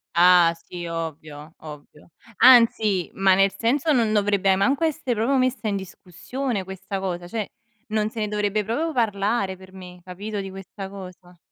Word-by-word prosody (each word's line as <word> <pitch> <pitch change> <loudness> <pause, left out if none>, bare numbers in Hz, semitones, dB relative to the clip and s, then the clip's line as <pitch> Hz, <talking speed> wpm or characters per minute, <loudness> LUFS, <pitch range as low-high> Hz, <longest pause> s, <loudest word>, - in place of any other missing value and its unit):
Ah, 175 -1 +6
sì, 175 -1 -7
ovvio, 155 -2 -7
ovvio. 150 0 -13 0.3
Anzi, 225 -6 +5
ma 195 0 +3
nel 195 0 +3
senso, 275 +7 +1
non 230 -6 +2
dovrebbe 200 -2 +2
manco 270 +11 +1
essere 290 -5 -1
proprio 250 +6 +1
messa 255 -4 0
in 205 - 0
discussione 200 +5 -5
questa 190 +1 -6
cosa; 175 -2 -4
cioè 215 +2 -4 0.4
non 215 0 0
se 230 - -8
ne 210 - -1
dovrebbe 210 0 -1
proprio 285 +11 -2
parlare 205 -3 0
per 185 0 -16
me, 180 -1 -12
capito, 200 +3 -6
di 195 - -7
questa 195 +1 -9
cosa. 180 -2 -12
195 Hz, 160 wpm, -23 LUFS, 180-220 Hz, 0.4 s, Ah